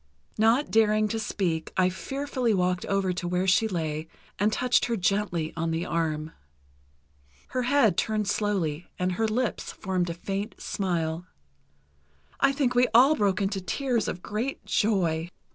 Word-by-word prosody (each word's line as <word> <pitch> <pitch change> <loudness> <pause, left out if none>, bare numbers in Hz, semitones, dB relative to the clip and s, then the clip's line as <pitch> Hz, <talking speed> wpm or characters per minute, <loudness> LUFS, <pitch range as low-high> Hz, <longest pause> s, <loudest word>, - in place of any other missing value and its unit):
Not 230 +6 +3
daring 215 -1 +4
to 225 - -2
speak 175 -6 -2
I 185 -1 +4
fearfully 260 +3 -2
walked 180 -1 0
over 195 -2 +1
to 175 0 -4
where 180 +1 0
she 190 +4 +4
lay 160 -5 -3 0.3
and 205 +2 +3
touched 250 +2 +2
her 235 -1 -1
gently 180 -4 0
on 165 0 -1
the 165 +2 -1
arm. 160 -2 -2 1.2
Her 255 - -1
head 250 -4 +3
turned 215 -2 0
slowly, 180 -8 -1
and 180 0 0
her 220 +5 0
lips 235 +2 -1
formed 185 -2 -2
a 165 - -4
faint 195 +4 -4
smile. 170 -3 -2 1.1
I 275 - +4
think 270 -2 0
we 250 0 +4
all 265 +6 +7
broke 200 -4 +1
into 195 0 -1
tears 245 +3 -1
of 180 - -4
great 230 +6 -3
joy. 175 -6 +1
195 Hz, 155 wpm, -27 LUFS, 175-225 Hz, 1.2 s, all